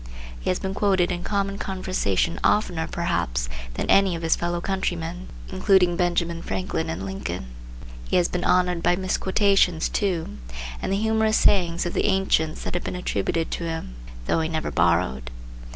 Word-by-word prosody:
He - - -3
has 185 - +2
been 190 0 -3
quoted 190 -3 +2
in 175 -1 -3
common 200 -1 -1
conversation 185 - -1
oftener, 180 -6 +2
perhaps, - - -1 0.3
than - - -2
any 195 -3 +4
of 165 - -6
his 165 - +3
fellow 175 0 -2
countrymen, 175 -1 -3 0.2
including 185 -2 +3
Benjamin 170 -1 0
Franklin 185 -3 -2
and 90 +4 -4
Lincoln. 95 -9 -4 0.6
He - - +1
has 175 -1 +4
been 180 - -3
honored 180 -1 +2
by 175 +1 +3
misquotation, 190 -1 +2
too, 170 - -1 0.4
and - - -2
the 195 - +2
humorous 220 0 +2
sayings 175 -3 +3
of 175 - -2
the - - 0
ancients 190 -5 +1
have 175 - -3
been - - -4
attributed 170 -2 -1
to 170 - -3
him, 160 - -4 0.3
though - - +1
he 160 0 -1
never 160 -1 -2
borrowed. 85 -8 +1
175 Hz, 165 wpm, -24 LUFS, 160-190 Hz, 0.6 s, any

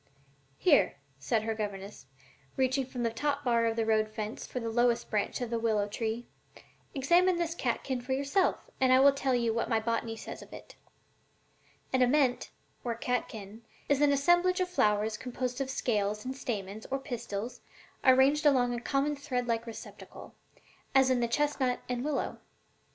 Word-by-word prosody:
"Here," 310 -6 +4 0.2
said 220 - 0
her 225 0 -1
governess, 200 -8 -6 0.5
reaching 260 0 +1
from 250 -2 -4
the 230 - +1
top 290 +4 -1
bar 235 -3 +2
of 225 - 0
the 225 -1 0
road 215 -1 +2
fence 215 0 -5
for 250 - -4
the 230 -1 -3
lowest 240 0 +1
branch 210 +3 -1
of 240 -1 -3
a 230 - +1
willow 215 -3 +1
tree; 225 +3 -3 0.7
"examine 345 +7 +4
this 340 -1 -1
catkin 255 -3 -2
for 260 +2 -3
yourself, 280 +8 0
and 260 -1 +4
I 255 - +7
will 280 +1 +7
tell 270 -2 0
you 235 -2 +1
what 230 - -1
my 225 -2 +2
Botany 230 0 -2
says 220 - -8
of - - -13
it: - - -11 1.2
'An 260 - +3
ament, 255 0 +2 0.3
or 235 -2 -2
catkin, 225 -3 -4 0.3
is 285 0 +2
an 290 -1 +5
assemblage 350 +6 +3
of 365 -1 0
flowers 215 -9 +1
composed 250 +1 -4
of 265 - -2
scales 210 -5 -1
and 260 +1 -4
stamens 215 -5 -5
or 270 - -1
pistils 235 -3 -5 0.4
arranged 270 +3 +5
along 250 -4 +3
a 240 - -4
common 280 +3 0
thread 255 -3 -2
like 230 0 -1
receptacle, 225 - -10 0.6
as 265 -1 +5
in 255 - +2
the 235 - +1
chestnut 265 -1 0
and 245 0 -2
willow. 295 -1 -2
245 Hz, 175 wpm, -30 LUFS, 225-275 Hz, 1.2 s, I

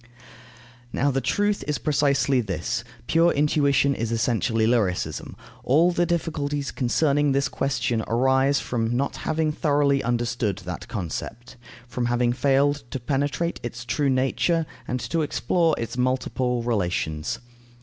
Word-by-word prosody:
Now, 140 +4 +1
the 135 0 0
truth 205 +5 0
is 150 -2 0
precisely 140 -3 +2
this: 95 -5 -3 0.2
pure 165 +1 +4
intuition 140 -1 +2
is 115 -3 -3
essentially 115 0 +1
lyricism. 110 -6 0 0.3
All 160 +7 +4
the 175 0 +1
difficulties 145 -4 -2
concerning 140 +3 +1
this 140 0 +1
question 120 -5 -1
arise 130 +3 +3
from 120 0 -1
not 140 +2 -1
having 155 -1 0
thoroughly 145 -2 +2
understood 120 -4 -1
that 90 0 -6
concept, 115 +6 -6 0.3
from 120 0 -2
having 120 0 +1
failed 140 +2 +2
to 135 - -4
penetrate 140 +6 -1
its 120 0 -6
true 140 +4 0
nature 135 +6 +1 0.2
and 125 - -2
to 165 0 -1
explore 160 +2 +1
its 115 +2 -4
multiple 125 -1 0
relations. 90 -9 -1
135 Hz, 130 wpm, -24 LUFS, 120-145 Hz, 0.3 s, pure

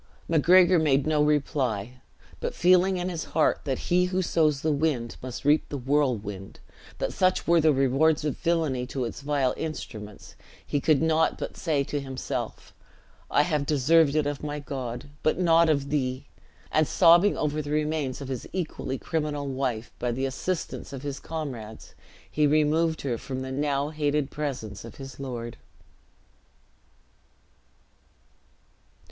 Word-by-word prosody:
Macgregor 175 +2 +5
made 140 -3 +2
no 155 -1 +2
reply, 130 -6 0 0.4
but - - -4
feeling 185 +1 +4
in 180 0 -2
his 170 -3 -3
heart 155 - +3
that 135 -3 -1
he 180 +1 +2
"who 185 +1 -1
sows 155 -5 +2
the 155 - +1
wind, 140 -6 -1
must 130 +1 -7
reap 150 +2 +3
the 145 - -4
whirlwind;" 120 -8 -1 0.4
that - - -2
such 185 0 +1
were 170 0 +5
the 155 0 +5
rewards 140 +3 +2
from 150 -3 0
villainy, 160 -7 0
to 130 0 -3
its 115 - -6
vile 140 -3 +1
instruments; 105 -10 -7 0.3
he 145 - -1
could 155 0 +3
not 160 0 +2
but - - -5
say 150 -5 0
to 145 +1 -3
himself, 135 -1 -5 0.6
"I 145 - +4
have 150 -4 -1
deserved 150 +1 +4
it 155 -2 +2
of 145 -1 -3
my 150 0 -4
God, 130 -4 -5
but 155 - +1
not 170 -2 +4
of 140 -2 0
thee!" 130 -2 -1 0.5
and 155 -1 +3
sobbing 175 +3 +5
over 150 0 -1
the 145 - -7
remains 150 -3 -1
of 140 - -6
his 130 -3 -5
equally 155 -7 -3
criminal 150 -3 -2
wife, 125 -4 -2
by 120 0 -1
the 130 +3 -2
assistance 160 +6 -4
of 135 0 -7
his 140 -1 -4
comrades 125 -9 -7 0.4
he 150 -1 +3
removed 155 +2 +2
her 120 -5 -2
from 130 -1 -5
the 130 - -5
now 140 +1 0
hated 150 -2 -1
presence 125 -9 -5
of 115 - -10
his 135 -1 -10
lord. 120 -4 -5
145 Hz, 155 wpm, -26 LUFS, 130-160 Hz, 0.6 s, Macgregor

